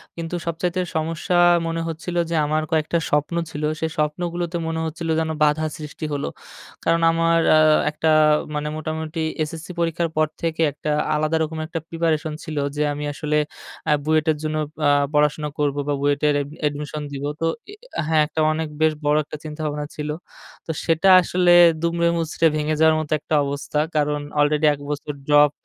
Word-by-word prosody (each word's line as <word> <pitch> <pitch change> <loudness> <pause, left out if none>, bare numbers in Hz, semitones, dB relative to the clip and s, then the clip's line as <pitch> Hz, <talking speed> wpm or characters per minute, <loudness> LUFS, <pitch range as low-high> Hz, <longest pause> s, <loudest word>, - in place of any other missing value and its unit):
কিন্তু 165 +1 -4
সবচাইতে 175 +2 -1
সমস্যা 165 +2 -1 0.3
মনে 165 0 -2
হচ্ছিলো 170 +2 -3
যে, 170 - -1
আমার 155 +1 0
কয়েকটা 160 +1 +1
স্বপ্ন 150 +3 0
ছিল। 150 -1 -6 0.2
সেই 160 0 -2
স্বপ্নগুলোতে 170 +3 -2
মনে 165 0 -2
হচ্ছিলো 165 +1 -3
যেন 160 0 -1
বাধা 150 +1 +2
সৃষ্টি 155 0 -7
হলো। 140 - -2 0.6
কারণ 165 0 +2
আমার 165 0 +2 0.2
আ - - +6 0.3
একটা 160 +1 0 0.5
মানে 150 0 -2
মোটামুটি 155 +1 -4 0.2
এসএসসি 160 +3 -7
পরীক্ষার 170 0 0
পর 155 0 +3
থেকে 165 -1 -1
একটা 150 +2 -6 0.3
আলাদা 155 +1 0
রকম 160 +1 -4
একটা 165 0 -4
প্রিপারেশন 160 -2 -1
ছিল। 155 -3 -6 0.2
যে, 150 - -1
আমি 145 +1 -5
আসলে 150 +1 -2 0.5
আ - - +4
বুয়েটের 155 0 +2
জন্য 155 0 -2 0.3
আ - - +5 0.2
পড়াশোনা 150 0 +2
করবো 145 -1 0
বা 145 - +1
বুয়েটের 145 +1 +2
অ্যাড 145 0 -4 0.2
admission 150 +1 -5
দিব। 140 0 -6 0.2
তো - - +1 0.3
এ - - -10
এ - - -10 0.2
আ - - +2
হ্যাঁ, 160 -1 +4
একটা 155 +1 -2
অনেক 160 +1 -2
বেশ 160 0 +4
বড় 150 +1 +3
একটা 155 - -7
চিন্তাভাবনা 150 -1 -4
ছিল। 150 0 -4 0.6
তো - - -3
সেটা 165 +3 +3
আসলে 180 0 +2 0.3
দুমড়ে 170 0 +1
মুচড়ে 165 0 +1
ভেঙে 155 0 0
যাওয়ার 160 0 +5
মতো 155 -2 -5
একটা 155 - -2
অবস্থা। 140 +1 -3 0.2
কারণ 150 0 +1 0.2
আলরেডি 150 +1 +3
এক 145 - -8
বছর 150 0 -4
ড্রপ 145 -1 +6
155 Hz, 175 wpm, -22 LUFS, 150-165 Hz, 0.6 s, আ